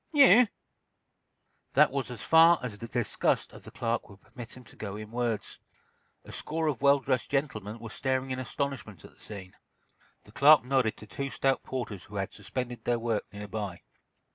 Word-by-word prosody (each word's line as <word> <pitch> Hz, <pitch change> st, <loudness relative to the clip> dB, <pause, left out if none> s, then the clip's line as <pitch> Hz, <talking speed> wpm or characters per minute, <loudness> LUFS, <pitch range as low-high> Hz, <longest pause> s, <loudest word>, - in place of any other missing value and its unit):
"You—" 250 Hz, -, +7 dB, 1.3 s
That -, -, +5 dB
was 135 Hz, -2 st, -2 dB
as 120 Hz, -5 st, -7 dB
far 165 Hz, +1 st, +7 dB
as 120 Hz, -5 st, -4 dB
the 115 Hz, +3 st, -8 dB
disgust 120 Hz, -2 st, 0 dB
of -, -, -12 dB
the -, -, -12 dB
clerk 115 Hz, 0 st, -2 dB
would 100 Hz, -1 st, -14 dB
permit 120 Hz, +2 st, -11 dB
him 130 Hz, -, -12 dB
to -, -, -16 dB
go 100 Hz, -2 st, -6 dB
in 105 Hz, 0 st, -8 dB
words. 115 Hz, -4 st, -2 dB, 0.7 s
A -, -, -10 dB
score 160 Hz, +1 st, -3 dB
of 145 Hz, -6 st, -1 dB
well 140 Hz, 0 st, +6 dB
dressed 130 Hz, -2 st, -1 dB
gentlemen 115 Hz, -7 st, -2 dB
were 115 Hz, -1 st, -9 dB
staring 130 Hz, +1 st, -1 dB
in 130 Hz, -, -2 dB
astonishment 130 Hz, -, -4 dB
at -, -, -13 dB
the -, -, -25 dB
scene. 95 Hz, -3 st, -9 dB, 0.7 s
The -, -, -18 dB
clerk 145 Hz, -2 st, +6 dB
nodded 130 Hz, -4 st, +1 dB
to -, -, -11 dB
two 140 Hz, +6 st, -4 dB
stout 135 Hz, -2 st, +1 dB
porters 120 Hz, -7 st, -5 dB
who 105 Hz, -, -12 dB
had 95 Hz, -1 st, -3 dB
suspended 120 Hz, +4 st, -5 dB
their 120 Hz, -1 st, +1 dB
work 115 Hz, -2 st, -2 dB
nearby. 100 Hz, -3 st, -6 dB
120 Hz, 185 wpm, -29 LUFS, 105-135 Hz, 1.3 s, You